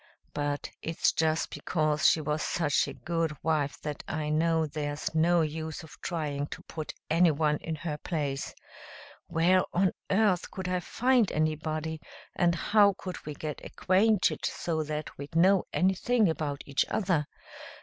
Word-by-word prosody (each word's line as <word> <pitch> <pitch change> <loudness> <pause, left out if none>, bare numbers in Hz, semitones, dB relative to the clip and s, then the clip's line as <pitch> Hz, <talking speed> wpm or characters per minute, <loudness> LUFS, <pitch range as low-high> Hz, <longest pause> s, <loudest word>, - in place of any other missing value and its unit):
But 145 0 -2
it's 165 0 +1
just 160 0 0
because 155 -3 +2
she 160 - +2
was 150 +1 -1
such 150 -4 +1
a - - -5
good 165 -2 -2
wife 150 -3 0
that 150 -1 -4
I 150 -1 -2
know 160 +1 +2
there's 145 0 -4
no 170 +2 +4
use 160 +1 -3
of 160 - -13
trying 145 -4 -2
to - - -9
put 155 -2 -6 0.2
anyone 155 -3 +3
in 160 +1 -4
her 150 -1 -4
place. 145 -5 -3 0.7
Where 180 +3 +3
on 185 0 +3 0.2
earth 195 -3 +2
could 190 -1 -5
I 180 0 0
find 245 +4 +2
anybody, 155 0 -1 0.3
and 170 -1 +3
how 205 +2 +4
could 185 -2 -7
we 150 - -4
get 150 0 -6
acquainted 200 +2 +2
so 160 -2 -1
that 155 0 -4
we'd 145 +3 -8
know 185 +3 +5
anything 195 +5 +2
about 145 -3 -3
each 140 -1 +1
other? 180 -8 +1
160 Hz, 150 wpm, -29 LUFS, 150-180 Hz, 0.7 s, know